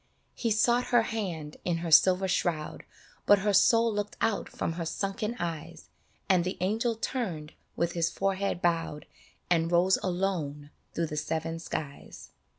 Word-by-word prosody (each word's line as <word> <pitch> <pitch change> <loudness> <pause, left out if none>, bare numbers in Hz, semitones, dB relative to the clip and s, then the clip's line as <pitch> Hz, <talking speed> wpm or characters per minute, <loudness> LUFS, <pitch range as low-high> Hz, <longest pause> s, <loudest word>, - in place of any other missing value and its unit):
" - - -43
He 235 - -2
sought 240 +3 +3
her 240 -2 +3
hand 175 -10 -4
in 175 -2 0
her 165 - -3
silver 185 +4 +6
shroud 165 -4 -1 0.4
But 205 - +7
her 205 - +3
soul 230 +3 +4
looked 205 0 -3
out 225 -2 0
from 165 - -3
her 170 0 -4
sunken 210 +7 -3
eyes, 165 -2 -6 0.4
And 185 -2 +4
the 185 +2 -3
angel 220 +6 0
turned 185 - -4 0.2
with 170 0 0
his 170 -1 0
forehead 195 -2 -1
bowed 165 -3 0 0.5
And 165 -1 +2
rose 180 +2 +4
alone 175 -6 -2 0.2
through 170 - 0
the 150 -1 -5
seven 160 +2 -2
skies. 150 -3 -7
175 Hz, 155 wpm, -29 LUFS, 165-205 Hz, 0.5 s, But